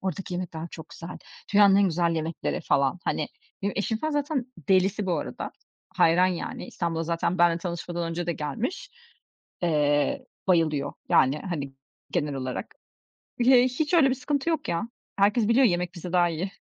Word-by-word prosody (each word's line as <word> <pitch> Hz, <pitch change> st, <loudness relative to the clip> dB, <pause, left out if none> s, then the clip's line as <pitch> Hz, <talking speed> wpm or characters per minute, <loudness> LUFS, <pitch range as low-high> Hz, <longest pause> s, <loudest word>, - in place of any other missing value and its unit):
Oradaki 190 Hz, -1 st, -4 dB
yemekler 170 Hz, -2 st, -4 dB
çok 160 Hz, -1 st, -10 dB
güzel. 170 Hz, +1 st, -9 dB, 0.4 s
Dünyanın 200 Hz, -1 st, +7 dB
en 200 Hz, -, +5 dB
güzel 170 Hz, -2 st, +1 dB
yemekleri" 160 Hz, 0 st, -2 dB
falan. 140 Hz, +5 st, +1 dB
Hani, -, -, -1 dB, 0.3 s
benim 200 Hz, -, 0 dB
eşim 220 Hz, +2 st, -1 dB
falan 310 Hz, +3 st, -2 dB
zaten 290 Hz, -3 st, 0 dB, 0.2 s
delisi 190 Hz, +1 st, +3 dB
bu 180 Hz, -, +1 dB
arada. -, -, -5 dB, 0.5 s
Hayran 175 Hz, +3 st, +5 dB
yani 180 Hz, -2 st, -4 dB
İstanbul'a 165 Hz, -1 st, -2 dB
zaten 170 Hz, +2 st, -1 dB
benimle 170 Hz, -1 st, +4 dB
tanışmadan 170 Hz, -1 st, -4 dB
önce 170 Hz, +1 st, -3 dB
de 170 Hz, -, +1 dB
gelmiş. 225 Hz, -, -4 dB, 0.7 s
Eee, 145 Hz, -4 st, +1 dB, 0.2 s
bayılıyor 160 Hz, -6 st, +2 dB, 0.2 s
yani, 135 Hz, +3 st, +4 dB
hani, 150 Hz, -6 st, -4 dB, 0.4 s
genel 145 Hz, -1 st, -1 dB
olarak. 130 Hz, -1 st, -5 dB, 0.7 s
He 250 Hz, -1 st, +7 dB
hiç 295 Hz, +7 st, 0 dB
öyle 295 Hz, -5 st, +6 dB
bir 260 Hz, -, +1 dB
sıkıntı 285 Hz, +4 st, -1 dB
yok 315 Hz, -2 st, -2 dB
ya. 170 Hz, +7 st, -1 dB, 0.3 s
Herkes 205 Hz, +2 st, +3 dB
biliyor, 250 Hz, +3 st, +5 dB
yemek 180 Hz, -2 st, 0 dB
bizde 175 Hz, 0 st, -7 dB
daha 175 Hz, -1 st, +4 dB
iyi. 170 Hz, +4 st, -3 dB
175 Hz, 160 wpm, -26 LUFS, 165-210 Hz, 0.7 s, Dünyanın